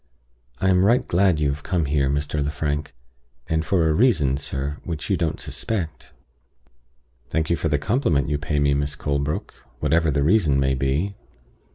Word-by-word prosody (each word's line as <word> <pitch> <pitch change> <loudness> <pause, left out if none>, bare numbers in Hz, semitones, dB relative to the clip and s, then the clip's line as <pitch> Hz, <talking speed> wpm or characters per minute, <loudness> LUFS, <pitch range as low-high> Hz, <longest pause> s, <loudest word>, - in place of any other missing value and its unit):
I 95 - +1
am 90 0 +4
right 120 +5 +3
glad 90 -2 +3
you 75 -2 +2
have 70 +1 -3
come 90 -3 -1
here, 70 -1 +1
Mr. 75 +1 -1
Lefrank; 75 -1 -3 0.5
and 80 0 0
for 85 0 +2
a 80 - +2
reason, 75 - +3
sir, 70 +1 -3
which 80 +3 -4
you - - +4
don't 85 -2 -1
suspect." 95 -8 -4 1.2
"Thank 80 +1 -1
you - - +4
for 80 - -2
the 75 - +2
compliment 80 - +1
you 75 -1 -1
pay 75 0 -2
me, 70 -1 +3
Miss 70 0 -1
Colebrook, 70 0 -2 0.3
whatever 80 -1 +2
the 70 -1 +1
reason 80 -5 +3
may 65 -1 +2
be." 70 +9 0
75 Hz, 175 wpm, -23 LUFS, 70-85 Hz, 1.2 s, am